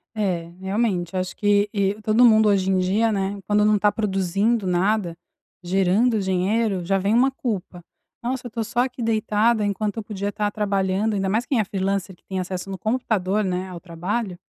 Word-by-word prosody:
É, 180 -6 -1
realmente. 190 -3 -1
Acho 185 0 -2
que 205 0 +2
e 200 -1 +1
todo 220 +3 +4
mundo 220 -2 +6
hoje 190 -1 +2
em 190 - +2
dia, 210 +5 +2
né, 200 0 -2
quando 210 0 +3
não 210 0 +4
tá 205 +1 +3
produzindo 200 +2 0
nada, 185 0 +1 0.5
gerando 195 +6 +2
dinheiro, 190 +1 0
já 195 +2 +1
vem 200 +3 0
uma 250 +3 +4
culpa: 200 -9 -4 0.4
"Nossa, 250 0 -3
eu - - -12
tô 230 0 -2
só 230 +2 -3
aqui 250 -1 -1
deitada 220 0 +2
enquanto 205 +2 -2
eu 225 - -3
podia 205 -1 -4
estar 205 0 -1
trabalhando". 200 0 0
Ainda 195 -1 -1
mais 225 +5 0
quem 260 -5 0
é - - +3
freelancer, 195 -1 -2
que - - -36
tem 190 -1 -4
acesso 185 +1 -4
no 190 - -4
computador, 215 -2 0
né, 185 -1 -2
ao 180 -2 -8
trabalho, 180 +4 -3
200 Hz, 190 wpm, -23 LUFS, 190-220 Hz, 0.5 s, mundo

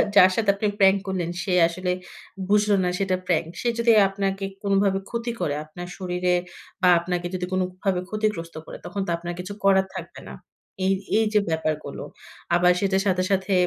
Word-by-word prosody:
যার 185 -1 +8
সাথে 215 -3 +1
আপনি 210 +1 -1
প্রাঙ্ক 195 0 +6
করলেন 180 -3 -2
সে 185 - -2
আসলে 180 +2 -3 0.6
বুঝল 210 +1 +3
না 180 - +1
সেটা 195 -2 +1
প্রাঙ্ক। 165 -2 +1
সে - - -1
যদি 235 0 +4 0.2
আপনাকে 195 0 -2 0.2
কোনভাবে 195 -1 +2
ক্ষতি 235 0 -3
করে 145 - 0
আপনার 175 +3 -9
শরীরে 180 -1 0 0.5
বা 180 - +5
আপনাকে 175 0 -2
যদি 180 -1 -2
কোনভাবে 185 0 -1
ক্ষতিগ্রস্ত 210 -7 -2
করে - - -9
তখন 195 +3 -4
তো 170 - -1
আপনার 175 +1 -5
কিছু 185 +3 -5
করার 190 -1 +4
থাকবে - - -7
না। - - -8 0.5
এই, 195 - +3 0.2
এই 220 - +3
যে 210 - +5
ব্যাপারগুলো। 155 -1 -2 0.5
আবার 180 +1 +5
সেটার 195 0 +1
সাথে, 185 -1 +2
সাথে 195 0 +1
185 Hz, 175 wpm, -24 LUFS, 180-200 Hz, 0.6 s, যার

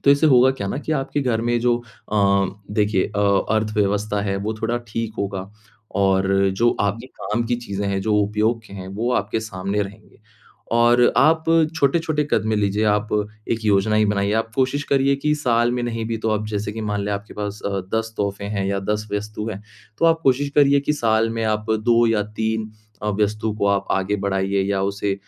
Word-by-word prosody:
तो 140 - +6
इससे 140 +3 +4
होगा 130 -2 +6
क्या 100 -7 -4
न 135 - -3
कि 155 - 0
आपके 145 0 -1
घर 115 -3 0
में 120 0 +1
जो 120 0 +2 0.4
अ, 100 -2 +3 0.2
देखिए 105 -2 +1
अ, 100 -1 +2
अर्थव्यवस्था 105 -1 0
है, 100 -1 -1
वो 105 +3 -3
थोड़ा 120 +2 0
ठीक 110 +1 -3
होगा 100 -1 -3 0.5
और 95 -1 +2 0.3
जो 120 +2 +4
आपकी 105 +5 -1
काम 110 +3 -1
की 120 0 0
चीजें 100 -4 -4
हैं, 100 -1 -1
जो 105 +2 0
उपयोग 105 +3 +1
के - - -14
हैं, 95 -1 -7
वो 110 +6 -2
आपके 110 - 0
सामने 100 -1 -2
रहेंगे। 100 +2 -11 0.5
और 120 +1 +4
आप 160 +5 +4 0.3
छोटे-छोटे 155 +1 +1
कदमें 110 0 +1
लीजिए, 105 +1 +1
आप 105 +1 +1 0.4
एक 115 -1 -3
योजना 105 +1 +3
ही 110 0 +4
बनाइए। 100 0 0
आप 115 0 -1
कोशिश 135 +2 +1
करिए 140 0 +2
कि 150 +2 0
साल 120 -4 +2
में 125 -1 -2
नहीं 115 -2 -3
भी 115 0 -2
तो 110 0 -1
आप 105 0 -1
जैसे 105 0 -3
कि 110 - -6
मान 105 -1 -2
लें 105 - -1
आपके 100 +2 -6
पास 105 0 -5
अ, 100 -1 -1
10 110 0 -1
तोहफ़े 100 0 -2
हैं 100 -1 -2
या 100 0 0
10 105 +2 -2
वस्तु 105 +1 -3
हैं, 100 0 -7 0.4
तो 165 - +1
आप 165 0 +3
कोशिश 135 +2 +2
करिए 140 -1 +5
कि 150 - 0
साल 115 -4 +1
में 115 0 -3
आप 110 0 -1
2 115 +2 +3
या 110 -2 +2 0.2
3 110 0 -1 0.3
अ, 105 - -1
वस्तु 105 +1 0
को 100 - +1
आप 100 -1 +1
आगे 95 +2 0
बढ़ाइए 95 0 0
या 95 -1 0
उसे 100 0 -1
110 Hz, 205 wpm, -22 LUFS, 100-120 Hz, 0.5 s, तो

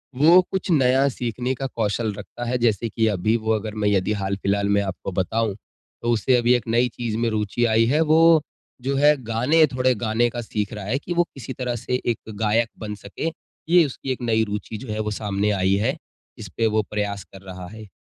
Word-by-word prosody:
वो 165 +7 +7
कुछ 190 -1 -2
नया 135 -2 +4
सीखने 125 0 -3
का 135 - -4
कौशल 110 -2 -1
रखता 105 +4 -8
है 125 - +1
जैसे 115 -1 +1
कि 110 +1 0
अभी 110 +2 +1
वो 110 -1 -2
अगर 110 0 -3
मैं 105 - +3
यदि 100 +1 +1
हाल-फिलहाल 100 +1 0
मैं 100 0 +3
आपको 95 0 -5
बताऊँ, 105 +3 -1 0.5
तो 120 - -2
उससे 120 +3 +2
अभी 120 0 +3
एक 120 -3 -3
नई 120 +2 +3
चीज़ 115 -3 -3
में 115 0 +1
रूचि 110 +2 0
आई 115 0 +3
है 140 +6 +2
वो 160 0 +5 0.4
जो 135 +2 -1
है 145 +2 +5
गाने 125 +8 +3
थोड़े 130 0 +3
गाने 115 +2 +2
का 120 0 -5
सीख 105 -1 -3
रहा 105 -3 -6
है 110 +7 0
कि 175 - -5
वो 175 0 +3
किसी 135 -1 -7
तरह 125 -1 -3
से 125 +2 -2
एक 120 -2 +1 0.2
गायक 110 +1 +2
बन 105 -2 -5
सके। 100 +10 -5 0.4
ये 175 -1 +6
उसकी 135 -1 -5
एक 130 - -4
नई 110 -2 +2
रूचि 105 +1 -5
जो 120 0 -7
है 110 - -3
वो 105 0 -2
सामने 105 0 -1
आई 95 -1 +1
है, 115 +7 0 0.4
जिसपे 110 +1 -2
वो 110 0 +2
प्रयास 105 -1 -2
कर 95 - -11
रहा 90 -1 -8
है। 110 +2 -11
115 Hz, 215 wpm, -23 LUFS, 105-125 Hz, 0.5 s, वो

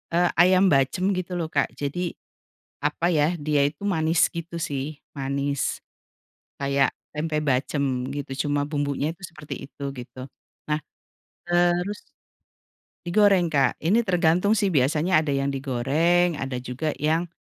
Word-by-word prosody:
eee, 175 0 +4
ayam 185 +1 +6
bacem 145 +8 +2
gitu 180 0 -4
loh, 165 -2 -3
Kak, 135 -3 +2
jadi 165 +6 -3 0.6
apa 165 +4 0
ya 155 +1 +2
dia 145 -2 +3
itu 150 +6 -6
manis 165 -4 +1
gitu 170 0 -7
sih, 140 +1 -4 0.2
manis 140 +1 -2 0.8
kayak 140 0 +2 0.2
tempe 155 0 -1
bacem 140 0 0 0.3
gitu 140 -1 -5 0.2
cuma 145 0 0
bumbunya 145 -1 -1
itu 195 - -32
seperti 150 -3 -8 0.2
itu, 140 - -10
gitu. 125 +1 -10 0.5
Nah 150 0 0 0.7
terus 175 +3 +1 1.1
digoreng, 185 -2 +4
Kak, 135 -3 +2
ini 205 +8 +4
tergantung 180 0 +2
sih 200 -3 +1
biasanya 155 +5 +3
ada 155 - -3
yang 135 0 0
digoreng 150 +6 +1
ada 135 -1 -3
juga 130 +5 -3
yang, 160 +3 0
155 Hz, 135 wpm, -25 LUFS, 140-175 Hz, 1.1 s, ayam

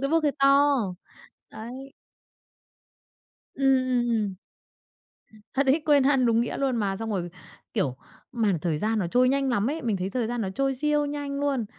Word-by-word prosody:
cái 275 +2 -1
bức 330 0 +3
hơi 290 -2 +2
to, 280 +1 +5 0.8
đấy. 255 +5 -9 1.6
Ừm, 270 -1 +3
ừm, 245 -1 +1
ừm. 210 -4 0 1.2
Thật 275 0 +1
ấy, 295 +4 +3
quên 290 -3 +5
ăn 270 -2 +3
đúng 230 -1 +3
nghĩa 235 - -2
luôn 270 -3 0
mà. 200 -3 -1
Xong 225 +1 -5
rồi, 175 -4 -2 0.4
kiểu, 130 -2 0 0.4
mà 225 -5 +1
thời 160 -4 -1
gian 220 +3 0
nó 185 - 0
trôi 250 +7 +3
nhanh 275 0 +1
lắm 240 +1 +1
ấy, 320 - -4
mình 225 -5 0
thấy 190 +1 -3
thời 240 0 -1
gian 240 +1 -3
nó 195 - -2
trôi 270 +3 0
siêu 295 +2 +1
nhanh 285 -1 -4
luôn. 280 -5 0
255 Hz, 185 wpm, -26 LUFS, 220-275 Hz, 1.6 s, to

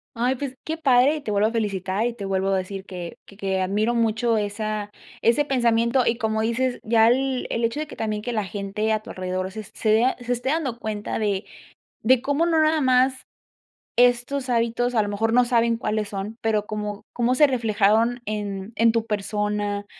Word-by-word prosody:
Ay, 245 +3 +1
pues 265 0 -5
qué 320 - -3
padre, 270 0 +4
y - - -5
te 250 - -5
vuelvo 205 +1 +2
a - - -3
felicitar, 200 -2 -1
y 240 - -1
te 210 -4 -7
vuelvo 195 0 0
a 195 -1 +2
decir 190 +1 -5
que 180 -3 -8
que 200 - -16
que 195 -1 -1
admiro 210 +5 0
mucho 230 0 +1
esa 210 0 -3 0.3
ese 235 +6 +3
pensamiento, 235 -2 +2
y 230 - +2
como 220 -2 0
dices 245 +3 0
ya 225 0 +4
el 260 +1 +1
el 230 - -1
hecho 230 +5 0
de 310 - -3
que - - -10
también 215 -1 -2
que 245 - -3
la 215 -3 -1
gente 200 +3 -2
a 215 - +1
tu 215 - -12
alrededor 185 0 -3
se 215 - -6
se 215 +2 -2
vea 235 +4 +3
se 245 0 -3
esté 245 +2 -2
dando 275 -6 -1
cuenta 215 -2 -4
de 205 -2 -1 0.6
de 250 +1 +4
cómo 285 +5 +1
no 330 -2 +2
nada 310 0 +3
más 260 0 +2 0.7
estos 245 +2 +2
hábitos 240 +1 0
a 220 - +4
lo 205 - -3
mejor 220 +2 0
no 250 +1 +5
saben 235 -1 +2
cuáles 215 -2 -2
son, 200 +2 -5
pero, 215 -2 0
como 210 -1 -5
cómo 245 +1 +1
se 295 - +7
reflejaron 230 -1 +2
en 205 -1 -4
en 230 0 +4
tu 225 0 -1
persona, 205 -1 -2
225 Hz, 205 wpm, -24 LUFS, 205-245 Hz, 0.7 s, se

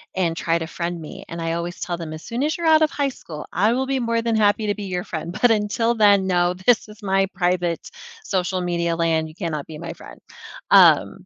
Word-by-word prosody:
and 170 -3 0
try 165 0 +1
to 165 -1 -4
friend 170 0 -4
me, 155 - -9
and 170 0 -6
I 165 0 -1
always 170 +1 -4
tell 175 -1 -3
them, 160 -2 -6
"As 155 - -9
soon 245 +3 -3
as 310 +2 0
you're 340 - -4
out 315 -1 +6
of 310 - +3
high 280 -1 0
school, 155 - -9
I 210 +5 +2
will 265 +1 -1
be 270 -1 0
more 230 -1 0
than 230 -1 0
happy 210 0 +2
to 205 - 0
be 210 - -7
your 180 -2 -3
friend, 170 -2 -6
but 245 - +5
until 225 +2 +1
then, 205 -3 +4
no, 175 -1 +2
this 200 +6 +2
is 210 +1 -15
my 195 0 +2
private 175 -2 -1 0.3
social 185 - -1
media 170 -1 -1
land, 165 -1 +1
you 155 - -13
cannot 160 -6 -4
be 155 - -8
my 170 +1 -6
friend." - - -13 0.5
Um, - - +5
180 Hz, 240 wpm, -22 LUFS, 170-220 Hz, 0.5 s, out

